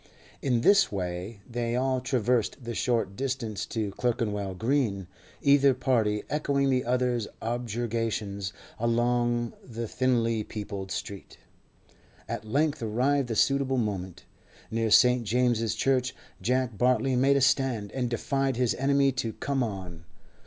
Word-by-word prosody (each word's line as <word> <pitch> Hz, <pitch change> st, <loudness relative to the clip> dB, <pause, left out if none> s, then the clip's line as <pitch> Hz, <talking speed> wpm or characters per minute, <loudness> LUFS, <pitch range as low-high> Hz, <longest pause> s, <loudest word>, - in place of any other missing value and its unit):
In 125 Hz, -4 st, +1 dB
this 195 Hz, +7 st, +5 dB
way 95 Hz, +2 st, -4 dB
they 120 Hz, -1 st, -2 dB
all 130 Hz, 0 st, +1 dB
traversed 125 Hz, 0 st, 0 dB
the 120 Hz, 0 st, -4 dB
short 115 Hz, -5 st, 0 dB
distance 125 Hz, -4 st, -3 dB
to 110 Hz, -3 st, -2 dB
Clerkenwell 105 Hz, -5 st, -1 dB
Green, 110 Hz, -4 st, 0 dB, 0.4 s
either 140 Hz, -2 st, +5 dB
party 115 Hz, -5 st, +1 dB
echoing 140 Hz, -2 st, +1 dB
the 130 Hz, -1 st, +2 dB
other's 125 Hz, -2 st, 0 dB
objurgations 115 Hz, -4 st, -2 dB, 0.3 s
along 120 Hz, 0 st, +1 dB
the 115 Hz, -1 st, -5 dB
thinly 115 Hz, -3 st, +1 dB
peopled 100 Hz, -3 st, -6 dB
streets. 95 Hz, +2 st, -6 dB, 0.9 s
At -, -, -4 dB
length 145 Hz, +6 st, 0 dB
arrived 125 Hz, +5 st, +1 dB
the 115 Hz, -, -3 dB
suitable 135 Hz, +3 st, +2 dB
moment. 95 Hz, -6 st, -3 dB, 0.5 s
Near 115 Hz, 0 st, 0 dB
St. 125 Hz, +2 st, +5 dB
James's 115 Hz, 0 st, +1 dB
Church 130 Hz, +2 st, +1 dB, 0.3 s
Jack 125 Hz, +2 st, 0 dB
Bartley 125 Hz, +1 st, +2 dB
made 135 Hz, +2 st, +4 dB
a -, -, +1 dB
stand, 130 Hz, -6 st, +1 dB
and 125 Hz, -2 st, -2 dB
defied 135 Hz, +3 st, 0 dB
his 125 Hz, -1 st, +1 dB
enemy 140 Hz, +1 st, +2 dB
to 115 Hz, -3 st, -3 dB
come 135 Hz, +3 st, -2 dB
on. 95 Hz, -7 st, -5 dB
120 Hz, 130 wpm, -28 LUFS, 110-130 Hz, 0.9 s, this